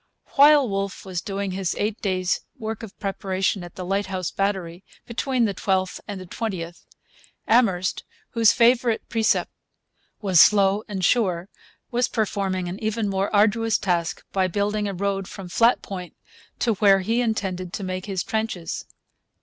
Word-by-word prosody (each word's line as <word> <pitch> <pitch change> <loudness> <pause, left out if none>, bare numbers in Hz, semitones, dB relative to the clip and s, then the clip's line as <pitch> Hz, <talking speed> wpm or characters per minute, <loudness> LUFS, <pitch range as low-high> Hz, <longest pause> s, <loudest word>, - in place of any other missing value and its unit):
While 285 -1 +7
Wolfe 195 -1 -3
was 185 -3 -3
doing 195 0 -3
his 185 -1 -2
eight 210 +1 -2
days' 185 -2 0 0.2
work 220 -2 -5
of 220 -2 -10
preparation 195 -1 -1
at 175 - -11
the 185 - -6
Lighthouse 190 -2 -2
Battery, 190 -3 -2 0.2
between 245 +1 0
the 205 - -1
12th 190 0 -1
and 205 -2 -5
the 185 - -8
20th, 175 -4 -5 0.6
Amherst, 195 -6 +2 0.3
whose 230 -2 +5
favourite 240 -1 +3
precept 225 -1 +1 0.7
was 185 -6 +5
'slow 200 -1 +5
and 190 -4 -2
sure,' 185 -6 +1 0.4
was 245 +1 +2
performing 195 -4 -1
an 185 +5 -6
even 215 0 0
more 195 +1 -1
arduous 220 +1 +3
task 175 -3 -1
by 190 -1 +2
building 205 +3 -1
a 200 - -3
road 195 0 -1
from 195 -2 -8
Flat 235 +6 +3
Point 180 -3 -7 0.4
to 230 - +1
where 195 -1 +4
he 225 +6 +1
intended 190 -6 -2
to 200 - -4
make 185 +1 -4
his 190 -3 -2
trenches. 220 -6 -3
195 Hz, 155 wpm, -24 LUFS, 185-220 Hz, 0.7 s, While